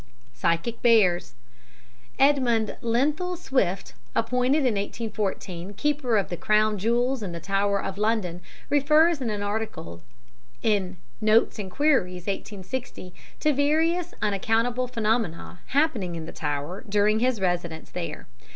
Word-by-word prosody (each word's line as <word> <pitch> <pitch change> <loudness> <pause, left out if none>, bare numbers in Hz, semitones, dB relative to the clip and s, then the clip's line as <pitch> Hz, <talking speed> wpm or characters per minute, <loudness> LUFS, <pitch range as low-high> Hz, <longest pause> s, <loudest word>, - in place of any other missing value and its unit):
Psychic 170 - -1
Bears 190 - +3 0.8
Edmund 250 -6 +3
Lenthal 295 +10 0
Swifte, 200 - -1 0.2
appointed 250 +5 +2
in 245 - +3
1814 200 -3 -4
Keeper 270 -1 +1
of 200 - 0
the 175 - -4
Crown 215 +1 +2
Jewels 240 +4 +1
in 185 -4 -4
the 170 - -5
Tower 200 +3 0
of 195 +1 -5
London, 210 -5 0 0.3
refers 305 +2 +4
in 240 - -1
an 205 -1 -2
article 205 - -4 0.6
in 195 -4 +1 0.2
Notes 215 +1 +3
and 195 -2 -4
Queries, 185 - +1
1860, 195 -1 -5 0.3
to 305 - +3
various 320 +5 +1
unaccountable 225 +5 +1
phenomena 220 -7 -1
happening 255 - +1
in 165 -1 -5
the - - -7
Tower 150 - -4
during 210 +1 +3
his 250 -1 +1
residence 175 -3 -2
there. 180 -2 -5
215 Hz, 125 wpm, -25 LUFS, 185-255 Hz, 0.8 s, refers